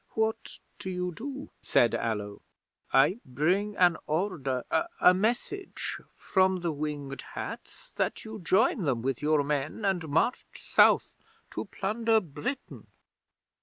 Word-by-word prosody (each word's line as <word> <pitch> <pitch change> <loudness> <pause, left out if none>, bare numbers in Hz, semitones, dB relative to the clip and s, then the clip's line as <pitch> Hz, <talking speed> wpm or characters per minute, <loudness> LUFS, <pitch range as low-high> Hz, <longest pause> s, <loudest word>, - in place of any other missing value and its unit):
'"What 220 0 -1 0.2
do 200 -2 -5
you 180 -1 -2
do?" 275 - -7
said 120 - +3
Allo. 105 -3 -2 0.5
"I 150 - +4
bring 180 +11 0
an 175 -3 +5
order 150 -6 -1 0.4
a 180 - +7
message 240 - -2
from 190 -1 +1
the 170 -1 0
Winged 145 -2 -4
Hats - - -7
that - - -1
you 220 0 -7
join 195 +5 +3
them 130 -8 0
with 135 -1 -1
your 150 -1 +3
men, 145 +8 -2
and 180 -5 0
march 165 - +2
South - - +4 0.4
to - - -4
plunder 225 +3 +1
Britain." 220 - -6
180 Hz, 130 wpm, -29 LUFS, 145-215 Hz, 0.5 s, a